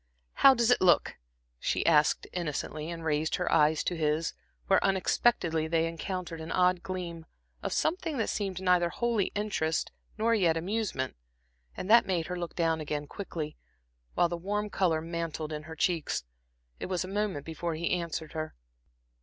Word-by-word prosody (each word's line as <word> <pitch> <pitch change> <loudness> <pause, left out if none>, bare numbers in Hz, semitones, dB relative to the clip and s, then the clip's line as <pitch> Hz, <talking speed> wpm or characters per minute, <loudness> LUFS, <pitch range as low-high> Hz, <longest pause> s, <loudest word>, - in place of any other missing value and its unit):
"How 270 -1 +7
does 235 0 +3
it - - +4
look?" 180 -2 +4 0.4
she - - 0
asked 150 -2 +4
innocently, 155 -2 -3
and 165 -1 -6
raised 155 0 +1
her 180 - -1
eyes 155 +1 +4
to 180 - -1
his, 155 0 0 0.3
where - - +3
unexpectedly 185 -4 +2
they 165 0 +2
encountered 170 0 -5
an 160 - -6
odd 180 -1 +3
gleam, 170 -3 -5 0.3
of - - -3
something 325 -2 0
that 225 - 0
seemed 195 -3 -2
neither 180 -2 +3
wholly 230 +1 0
interest 195 -7 -1 0.3
nor 225 +2 +2
yet 175 -7 +3
amusement, 185 -7 -2 0.6
and - - -4
that 230 +3 +6
made 175 -4 0
her 180 - -4
look 175 -1 -5
down 165 -2 +1
again 150 -1 -3
quickly, 155 -3 -6 0.6
while 175 - +4
the 170 0 -3
warm 205 +4 -2
color 165 -4 +2
mantled 165 -2 -4
in 150 - -4
her 160 - -6
cheeks. 165 - 0 0.6
It - - -4
was 185 -1 -1
a - - -6
moment 195 -7 -2
before 165 0 -3
he 170 +2 -2
answered 170 -3 -2
her. 155 - -4
170 Hz, 170 wpm, -30 LUFS, 160-190 Hz, 0.6 s, How